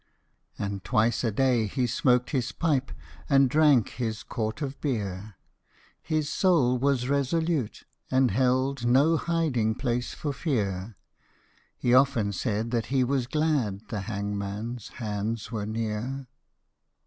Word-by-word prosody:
And 100 Hz, -1 st, -4 dB
twice 115 Hz, 0 st, +1 dB
a 115 Hz, -, +2 dB
day 120 Hz, -1 st, +2 dB
he 125 Hz, +4 st, -1 dB
smoked 125 Hz, +1 st, +2 dB
his 130 Hz, -4 st, -1 dB
pipe, 145 Hz, -5 st, 0 dB, 0.4 s
And 135 Hz, -1 st, +5 dB
drank 150 Hz, -7 st, +4 dB
his 110 Hz, -3 st, -4 dB
quart 110 Hz, +2 st, -3 dB
of 140 Hz, 0 st, -5 dB
beer: 105 Hz, -6 st, -3 dB, 0.7 s
His 155 Hz, -2 st, -1 dB
soul 150 Hz, -7 st, +2 dB
was 130 Hz, -2 st, +1 dB
resolute, 140 Hz, -1 st, 0 dB, 0.3 s
and 130 Hz, -1 st, +3 dB
held 130 Hz, +3 st, +1 dB
No 135 Hz, +7 st, +4 dB
hiding 145 Hz, -11 st, 0 dB
place 125 Hz, -1 st, -2 dB
for 145 Hz, -2 st, -3 dB
fear; 105 Hz, -, -2 dB, 0.8 s
He 120 Hz, -, +1 dB
often 125 Hz, -6 st, +4 dB
said 110 Hz, +3 st, -2 dB
that 115 Hz, -3 st, -1 dB
he 130 Hz, -1 st, +2 dB
was 130 Hz, -1 st, 0 dB
glad 140 Hz, -9 st, 0 dB
The 110 Hz, -5 st, -3 dB
hangmanâs 100 Hz, +2 st, -4 dB
hands 110 Hz, 0 st, -3 dB
were 105 Hz, -3 st, -3 dB
near. 115 Hz, +5 st, -3 dB
125 Hz, 130 wpm, -27 LUFS, 110-140 Hz, 0.8 s, And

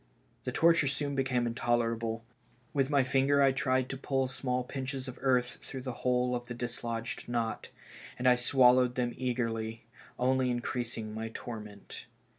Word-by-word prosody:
The -, -, -1 dB
torture 165 Hz, -3 st, +4 dB
soon 140 Hz, +1 st, -1 dB
became 130 Hz, -3 st, +1 dB
intolerable. 115 Hz, -1 st, 0 dB, 0.5 s
With 135 Hz, -2 st, +1 dB
my 140 Hz, -2 st, +4 dB
finger 135 Hz, +2 st, +3 dB
I 135 Hz, -, +6 dB
tried 130 Hz, -1 st, +1 dB
to 135 Hz, -, -3 dB
pull 135 Hz, 0 st, 0 dB
small 125 Hz, -1 st, -1 dB
pinches 135 Hz, 0 st, -4 dB
of 130 Hz, -, -8 dB
earth 125 Hz, -2 st, +2 dB
through 130 Hz, -2 st, -7 dB
the 130 Hz, -2 st, -3 dB
whole 125 Hz, 0 st, +2 dB
of 120 Hz, 0 st, -5 dB
the 120 Hz, -, -5 dB
dislodged 115 Hz, -1 st, -4 dB
knot, 115 Hz, -2 st, -2 dB, 0.5 s
and 125 Hz, -, +1 dB
I 125 Hz, -, +8 dB
swallowed 125 Hz, 0 st, +4 dB
them 120 Hz, -1 st, 0 dB
eagerly, 115 Hz, -3 st, -2 dB, 0.3 s
only 130 Hz, 0 st, +2 dB
in 120 Hz, -1 st, 0 dB
creasing 115 Hz, -3 st, -3 dB
my 110 Hz, +1 st, -4 dB
torment. 105 Hz, -4 st, -8 dB
125 Hz, 160 wpm, -31 LUFS, 120-130 Hz, 0.5 s, I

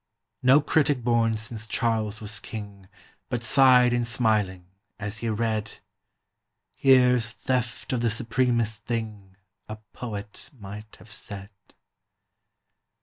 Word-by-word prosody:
No 130 Hz, +4 st, +6 dB
critic 145 Hz, -4 st, +1 dB
born 115 Hz, -2 st, +2 dB
since 110 Hz, 0 st, -5 dB
Charles 110 Hz, 0 st, -1 dB
was 105 Hz, -1 st, -4 dB
king 100 Hz, -4 st, -9 dB, 0.4 s
But 120 Hz, -1 st, -2 dB
sighed 125 Hz, 0 st, +6 dB
in 120 Hz, 0 st, +1 dB
smiling, 110 Hz, -6 st, 0 dB, 0.3 s
as 105 Hz, +1 st, -5 dB
he 115 Hz, -, -2 dB
read: 110 Hz, 0 st, -2 dB, 1.0 s
"Here 125 Hz, -2 st, +5 dB
's 115 Hz, -1 st, +2 dB
theft 125 Hz, +1 st, -2 dB
of 120 Hz, -, 0 dB
the 120 Hz, -, +2 dB
supremest 115 Hz, -1 st, 0 dB
thing 110 Hz, -5 st, -5 dB, 0.3 s
A 110 Hz, -, -4 dB, 0.2 s
poet 105 Hz, -4 st, -7 dB
might 105 Hz, 0 st, -10 dB
have 110 Hz, -, -16 dB
said!" 100 Hz, 0 st, -8 dB
115 Hz, 120 wpm, -26 LUFS, 105-120 Hz, 1.0 s, No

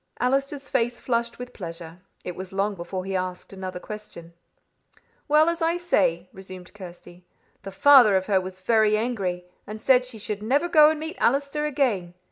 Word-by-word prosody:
Allister's 275 Hz, +2 st, -1 dB
face 240 Hz, +1 st, -1 dB
flushed 235 Hz, -1 st, -2 dB
with 250 Hz, 0 st, -9 dB
pleasure. 170 Hz, -2 st, -9 dB, 0.2 s
It 180 Hz, -, -6 dB
was 185 Hz, 0 st, -8 dB
long 200 Hz, +2 st, -1 dB
before 185 Hz, +1 st, -6 dB
he 195 Hz, 0 st, -3 dB
asked 185 Hz, +1 st, -4 dB
another 185 Hz, -1 st, -6 dB
question. 180 Hz, -5 st, -10 dB, 0.9 s
"Well, 305 Hz, +1 st, +4 dB
as 335 Hz, 0 st, -1 dB
I 330 Hz, +1 st, +1 dB
say," 180 Hz, -, 0 dB
resumed 185 Hz, -1 st, -11 dB
Kirsty, 180 Hz, -2 st, -12 dB, 0.4 s
"the 195 Hz, -, -8 dB
father 245 Hz, 0 st, +6 dB
of 190 Hz, 0 st, +1 dB
her 195 Hz, -2 st, +2 dB
was 185 Hz, 0 st, -9 dB
very 215 Hz, +1 st, +3 dB
angry, 195 Hz, -6 st, -3 dB, 0.2 s
and 215 Hz, +1 st, -7 dB
said 255 Hz, +2 st, +4 dB
she 250 Hz, -2 st, -8 dB
should 210 Hz, -1 st, -5 dB
never 275 Hz, +10 st, +1 dB
go 305 Hz, -3 st, +6 dB
and 315 Hz, -1 st, -2 dB
meet 320 Hz, +1 st, -6 dB
Allister 280 Hz, +3 st, 0 dB
again. 230 Hz, -12 st, -1 dB
210 Hz, 175 wpm, -24 LUFS, 185-270 Hz, 0.9 s, father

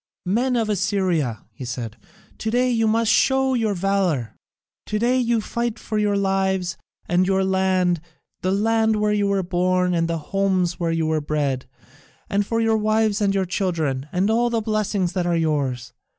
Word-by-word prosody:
"Men 245 Hz, +7 st, +1 dB
of 225 Hz, -2 st, +1 dB
Assyria," 185 Hz, -, 0 dB
he 135 Hz, -, -9 dB
said, 120 Hz, -3 st, -5 dB, 0.4 s
"to 220 Hz, -, -2 dB
day 250 Hz, +2 st, +2 dB
you 225 Hz, -2 st, +2 dB
must 225 Hz, +1 st, +2 dB
show 265 Hz, 0 st, +3 dB
your 220 Hz, -5 st, 0 dB
valour. 180 Hz, -, 0 dB, 0.5 s
To 210 Hz, -, -1 dB
day 245 Hz, +4 st, +2 dB
you 235 Hz, -2 st, +1 dB
fight 235 Hz, +1 st, -3 dB
for 215 Hz, 0 st, -3 dB
your 205 Hz, -1 st, +1 dB
lives 190 Hz, -2 st, 0 dB, 0.3 s
and 180 Hz, +1 st, +2 dB
your 190 Hz, 0 st, +2 dB
land, 185 Hz, -3 st, +1 dB, 0.4 s
the 185 Hz, -, 0 dB
land 220 Hz, +2 st, +2 dB
where 210 Hz, 0 st, +1 dB
you 205 Hz, -1 st, +1 dB
were 200 Hz, -1 st, +1 dB
born 180 Hz, 0 st, +1 dB
and 165 Hz, -1 st, +1 dB
the 165 Hz, 0 st, -1 dB
homes 185 Hz, +1 st, 0 dB
where 170 Hz, -1 st, 0 dB
you 165 Hz, -1 st, 0 dB
were 155 Hz, -1 st, 0 dB
bred, 145 Hz, -4 st, -2 dB, 0.6 s
and 200 Hz, +1 st, +2 dB
for 230 Hz, -, 0 dB
your 225 Hz, -1 st, +2 dB
wives 215 Hz, 0 st, +1 dB
and 200 Hz, -1 st, +2 dB
your 190 Hz, -1 st, +1 dB
children, 160 Hz, -8 st, -1 dB
and 190 Hz, +4 st, +1 dB
all 240 Hz, +2 st, +2 dB
the 230 Hz, -1 st, 0 dB
blessings 210 Hz, -4 st, -1 dB
that 175 Hz, -1 st, -1 dB
are 170 Hz, -1 st, +1 dB
yours. 140 Hz, -7 st, -1 dB
195 Hz, 180 wpm, -22 LUFS, 175-220 Hz, 0.6 s, show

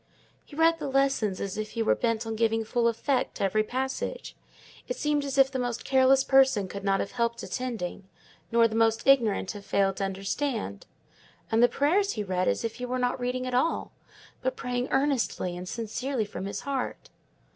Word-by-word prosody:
He 290 Hz, -, -14 dB
read 330 Hz, +1 st, +3 dB
the 295 Hz, -, -3 dB
Lessons 270 Hz, -8 st, +1 dB
as 200 Hz, +1 st, -4 dB
if 215 Hz, 0 st, -5 dB
he 230 Hz, -, 0 dB
were -, -, +4 dB
bent 230 Hz, -1 st, -1 dB
on 225 Hz, 0 st, -3 dB
giving 225 Hz, 0 st, +1 dB
full 235 Hz, +1 st, +1 dB
effect 250 Hz, +3 st, 0 dB
to -, -, -3 dB
every 195 Hz, +3 st, +2 dB
passage; 265 Hz, -, -4 dB, 0.5 s
it -, -, -2 dB
seemed 295 Hz, -1 st, 0 dB
as 275 Hz, -1 st, -3 dB
if 270 Hz, 0 st, +5 dB
the 260 Hz, -, -2 dB
most 245 Hz, -1 st, -3 dB
careless 265 Hz, 0 st, +4 dB
person 265 Hz, -8 st, +4 dB
could 200 Hz, +1 st, -7 dB
not 195 Hz, 0 st, +2 dB
have -, -, -3 dB
helped 235 Hz, 0 st, -1 dB
attending, 215 Hz, -7 st, -4 dB, 0.4 s
nor 230 Hz, 0 st, +5 dB
the 220 Hz, -, -7 dB
most 225 Hz, 0 st, +2 dB
ignorant 230 Hz, -8 st, +3 dB
have 205 Hz, -2 st, -9 dB
failed 195 Hz, -1 st, +1 dB
to -, -, -2 dB
understand; 195 Hz, -, -3 dB, 0.6 s
and 225 Hz, +1 st, +3 dB
the 245 Hz, -, +6 dB
prayers 380 Hz, +8 st, +2 dB
he 210 Hz, -, -3 dB
read 185 Hz, -2 st, -1 dB
as 100 Hz, -, 0 dB
if 225 Hz, -, -4 dB
he 250 Hz, -, -4 dB
were 255 Hz, +1 st, -1 dB
not 250 Hz, 0 st, 0 dB
reading 250 Hz, +1 st, -2 dB
at 255 Hz, -, -4 dB
all, 260 Hz, +7 st, 0 dB, 0.5 s
but -, -, -1 dB
praying 250 Hz, -, -2 dB
earnestly 265 Hz, -10 st, 0 dB
and 180 Hz, +1 st, -7 dB
sincerely 235 Hz, +2 st, -2 dB
from 200 Hz, -2 st, -6 dB
his 200 Hz, -, -4 dB
own -, -, -16 dB
heart." 260 Hz, -2 st, -4 dB
235 Hz, 200 wpm, -27 LUFS, 210-265 Hz, 0.6 s, the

